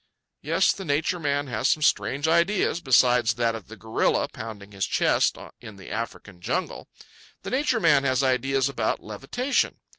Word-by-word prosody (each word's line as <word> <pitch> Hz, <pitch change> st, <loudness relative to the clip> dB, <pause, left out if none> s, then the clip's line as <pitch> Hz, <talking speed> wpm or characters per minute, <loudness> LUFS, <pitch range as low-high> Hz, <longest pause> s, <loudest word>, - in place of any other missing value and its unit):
Yes, -, -, +2 dB
the 195 Hz, -, -8 dB
Nature 160 Hz, +3 st, 0 dB
Man 145 Hz, -2 st, -1 dB
has 125 Hz, -, -1 dB
some 155 Hz, -, +1 dB
strange 145 Hz, +1 st, +1 dB
ideas 170 Hz, +1 st, +2 dB
besides 125 Hz, -4 st, +3 dB
that 115 Hz, -1 st, 0 dB
of 115 Hz, -3 st, -8 dB
the 110 Hz, -, -10 dB
gorilla 110 Hz, +3 st, 0 dB
pounding 105 Hz, -3 st, -9 dB
his 100 Hz, -3 st, -2 dB
chest -, -, +2 dB, 0.2 s
in 110 Hz, -4 st, -11 dB
the 95 Hz, -, -12 dB
African 105 Hz, -5 st, -6 dB
jungle. -, -, -3 dB, 0.5 s
The -, -, -6 dB
Nature 260 Hz, -2 st, +1 dB
Man 150 Hz, -7 st, +4 dB
has 130 Hz, 0 st, +1 dB
ideas 135 Hz, +1 st, +1 dB
about 140 Hz, -, -2 dB
levitation. 135 Hz, -, -1 dB
130 Hz, 160 wpm, -25 LUFS, 115-155 Hz, 0.5 s, Man